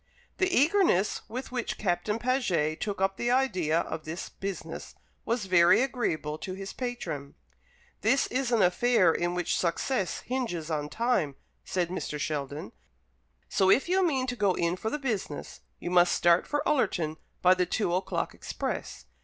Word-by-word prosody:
The 375 -1 +3
eagerness 305 - +3
with 250 +4 -5
which 245 -2 -3
Captain 190 +2 0
Paget 220 - 0
took 205 -2 -2
up 195 0 +1
the 240 - -1
idea 185 -11 +2
of 160 -2 -5
this 160 +4 -6
business 195 -1 -6 0.3
was 230 -2 -1
very 180 +4 +5
agreeable 155 - -2
to 185 - -5
his 195 0 -7
patron. 165 - -5 0.7
"This 255 +6 +3
is 255 -1 -1
an 225 -4 +4
affair 185 -1 +4
in 175 0 -1
which 175 -1 0
success 185 +4 -1
hinges 175 -11 -3
on 150 -1 -2
time," 220 - 0 0.3
said 180 -2 -1
Mr. 165 -4 -4
Sheldon; 145 -1 -3 0.8
"so, 190 -1 +2
if 265 - +4
you 375 +2 +3
mean 270 -7 +1
to 250 -1 -3
go 200 -5 +2
in 170 +1 0
for 220 +4 -3
the 295 - -2
business, 220 - -4 0.2
you 175 - -5
must 175 -1 +5
start 175 0 +4
for 290 0 -1
Ullerton 175 - +1 0.3
by 180 0 +7
the 180 -1 0
two 180 -2 0
o'clock 185 +2 -1
express. - - -5
190 Hz, 160 wpm, -28 LUFS, 170-245 Hz, 0.8 s, by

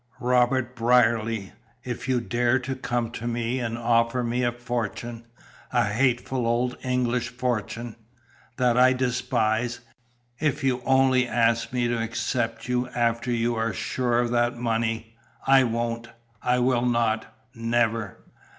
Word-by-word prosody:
"Robert 125 0 +2
Brierly, 115 -3 +2 0.3
if 125 +1 -5
you 125 -2 +2
dare 120 +2 +1
to 130 +1 -4
come 120 -3 -2
to 120 0 -5
me 120 +1 -1
and 115 -2 -3
offer 115 +1 +2
me 120 +1 -1
a 120 - +2
fortune, 120 -1 -4 0.4
a - - +3
hateful 120 +3 0
old 120 +2 +1
English 125 -1 0
fortune 120 -2 -3 0.6
that 125 -1 +3
I 130 +1 +6
despise; 120 -2 0 0.6
if 145 -2 0
you 130 -2 +1
only 130 -1 +4
ask 115 -1 +1
me 125 -1 0
to 120 -1 -1
accept 115 0 -2
you 125 0 0
after 120 0 0
you 120 0 +1
are 115 0 -1
sure 120 -2 -1
of 120 -1 0
that 120 0 +1
money, 115 -1 -2 0.3
I 135 -1 +6
won't! 115 0 -2 0.3
I 125 0 +2
will 125 -1 +2
not! 115 -2 0 0.2
Never!" 115 -3 -1
120 Hz, 140 wpm, -25 LUFS, 115-125 Hz, 0.6 s, I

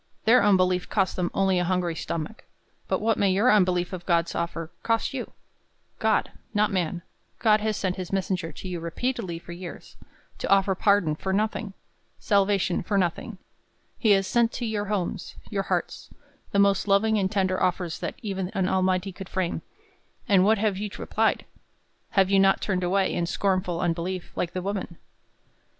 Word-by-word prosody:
Their 240 +2 +6
unbelief 185 -3 +3
cost 195 -3 +1
them 175 -1 -1
only 190 -2 +2
a - - +1
hungry 180 -1 0
stomach; 165 +8 -5 0.4
but - - 0
what 225 +1 +1
may 200 - +3
your 210 +7 +4
unbelief 180 -3 +2
of 180 -2 -5
God's 170 -2 +2
offer 165 -1 -3
cost 230 +3 0
you? 260 -3 -5 0.7
God - - +1 0.2
not 210 +1 +3
man 175 -2 -1 0.3
God 215 -2 +3
has 215 -1 -1
sent 185 -1 -1
his 185 -1 -5
messenger 185 -3 -1
to - - -9
you 180 -2 -4
repeatedly 180 +2 -3
for 170 - -11
years, 175 0 -9 0.4
to - - -3
offer 195 0 +4
pardon 195 -4 +3
for 190 +5 -3
nothing! 210 0 -1 0.4
Salvation 200 -3 +2
for 200 +3 -1
nothing! 190 +4 -1 0.6
He 225 - +2
has 195 -1 +2
sent 235 +4 +2
to 240 - -3
your 215 -2 -2
homes, 195 -4 -3 0.2
your 200 -2 0
hearts, - - -2 0.4
the - - 0
most 200 0 +3
loving 215 +2 +3
and 190 -1 0
tender 185 -3 0
offers 180 -2 0
that - - -4
even 190 -3 -3
an 190 -1 +1
Almighty 185 0 +1
could 190 +1 -9
frame; 185 -3 -2 0.7
and 195 -5 +5
what 220 +3 +4
have 205 -2 0
you 210 0 -3
replied? - - 0 0.7
Have 190 0 +4
you 195 - +5
not 195 0 +4
turned 185 -3 -1
away, 190 +2 +1
in 170 - -1
scornful 185 -2 0
unbelief, 175 +2 -2
like 175 -1 -2
the 185 - -3
woman? 195 -3 -4
190 Hz, 175 wpm, -26 LUFS, 180-205 Hz, 0.7 s, Their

